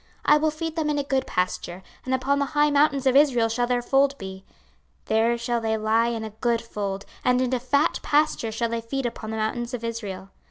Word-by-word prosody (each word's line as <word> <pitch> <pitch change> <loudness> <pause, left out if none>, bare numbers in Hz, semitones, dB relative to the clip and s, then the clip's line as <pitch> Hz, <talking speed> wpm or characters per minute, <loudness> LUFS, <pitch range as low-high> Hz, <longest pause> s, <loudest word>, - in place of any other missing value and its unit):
26:034:014 - - +6
I - - +6
will 310 +1 +2
feed 320 +1 -5
them 315 -2 0
in 295 - 0
a 285 - 0
good 270 -1 -1
pasture, 180 0 -2 0.2
and 260 - -1
upon 275 +2 0
the 280 - +1
high 295 +1 +2
mountains 285 -2 +3
of 260 -1 +3
Israel 265 -5 +4
shall 240 +2 0
their 245 -1 0
fold 275 +2 +2
be: 190 0 -8 0.6
there 225 +2 +2
shall 235 0 -1
they 220 0 0
lie 220 +2 +2
in 230 -2 -2
a 220 - -6
good 235 -2 +2
fold, 200 -3 -4 0.2
and 250 0 +3
in 255 0 0
a 255 - +1
fat 280 +4 +1
pasture 295 -6 +1
shall 230 +1 -1
they 230 0 -2
feed 265 +3 -3
upon 230 -2 -4
the 220 - -3
mountains 240 +3 -2
of 235 - -8
Israel. 200 -5 -5
240 Hz, 235 wpm, -25 LUFS, 220-280 Hz, 0.6 s, 26:034:014